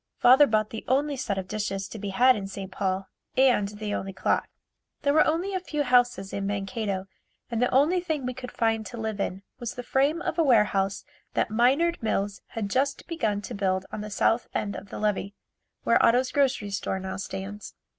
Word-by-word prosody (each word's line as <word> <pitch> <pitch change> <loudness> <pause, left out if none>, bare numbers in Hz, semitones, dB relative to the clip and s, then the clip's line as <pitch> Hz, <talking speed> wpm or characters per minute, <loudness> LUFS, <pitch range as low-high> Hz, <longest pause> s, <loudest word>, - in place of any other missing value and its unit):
Father 265 +4 +7
bought 215 -1 +1
the 225 - -6
only 280 +3 +1
set 205 -6 -2
of 190 -1 -3
dishes 195 -2 -3
to 220 - -8
be 200 0 -4
had 250 +6 +5
in 195 -2 -4
St. 195 -1 -7
Paul 190 0 -2 0.3
and 250 -6 +4
the 210 0 -5
only 195 -1 -3
clock. 190 - 0 0.6
There 285 -1 +3
were 310 - +5
only 345 +5 0
a 375 - 0
few 300 -5 -2
houses 245 -6 +2
in 200 0 -2
Mankato 200 -1 -2 0.5
and 230 0 -1
the 250 - +3
only 300 +8 +3
thing 315 -6 -2
we 250 - -2
could 250 0 -8
find 225 -1 +1
to 240 - -8
live 220 -2 -3
in 195 0 -3 0.2
was 240 -2 -5
the 245 - -5
frame 280 +6 +2
of 320 - -2
a - - +5
warehouse 210 -7 +2 0.3
that - - +1
Minard 275 +10 +3
Mills 205 -2 -1
had 220 -3 -4
just 275 +2 0
begun 215 -12 -1
to 240 - -6
build 190 -2 0
on - - -5
the 210 - -6
south 225 +3 +1
end 200 -1 -1
of 200 - -8
the - - -7
levee, 205 -1 -1 0.5
where - - +4
Otto's 250 +2 +4
grocery 265 -7 +1
store 195 -1 -2
now 190 0 -5
stands. 195 +2 -6
220 Hz, 205 wpm, -27 LUFS, 200-260 Hz, 0.6 s, Father